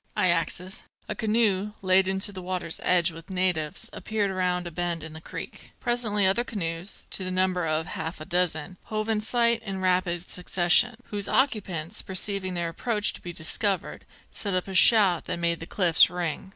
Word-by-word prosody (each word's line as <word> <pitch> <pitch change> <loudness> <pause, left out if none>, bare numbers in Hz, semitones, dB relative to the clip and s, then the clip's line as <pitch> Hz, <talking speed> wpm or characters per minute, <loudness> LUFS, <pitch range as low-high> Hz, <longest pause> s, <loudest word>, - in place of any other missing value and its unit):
I 185 -3 +3
axes." 170 +3 -1 0.3
A - - -2
canoe, 210 -2 +1
laden 190 +1 +3
to 205 - +2
the 190 -2 -8
water's 180 -2 -3
edge 175 -2 +3
with 165 +2 -12
natives, 180 -5 -1
appeared 210 -2 -2
round 180 -1 -1
a 175 - -6
bend 170 -1 -3
in 160 0 -8
the 160 - -10
creek. - - -9
Presently 230 -5 +1
other 195 +6 +3
canoes, 175 -5 -3
to 190 - -1
the 185 - -1
number 185 -2 +1
of 155 +1 0
half 160 +1 -5
a 155 - -8
dozen, 175 -1 -1
hove 215 0 -3
in 215 -1 +1
sight 235 +1 +2
in 195 -3 -5
rapid 180 -1 0
succession, 180 +6 +3 0.2
whose 205 -1 -3
occupants, 205 - 0
perceiving 190 -1 0
their 170 -1 -1
approach 210 +4 -1
to - - -11
be 175 - -6
discovered, 180 +4 -2 0.2
set 200 -3 -2
up 185 - -1
a 195 - -6
shout 190 -3 +6
that - - -3
made 170 -1 0
the 165 - -8
cliffs 175 -5 +4
ring. 175 +1 -3
185 Hz, 185 wpm, -26 LUFS, 170-205 Hz, 0.3 s, shout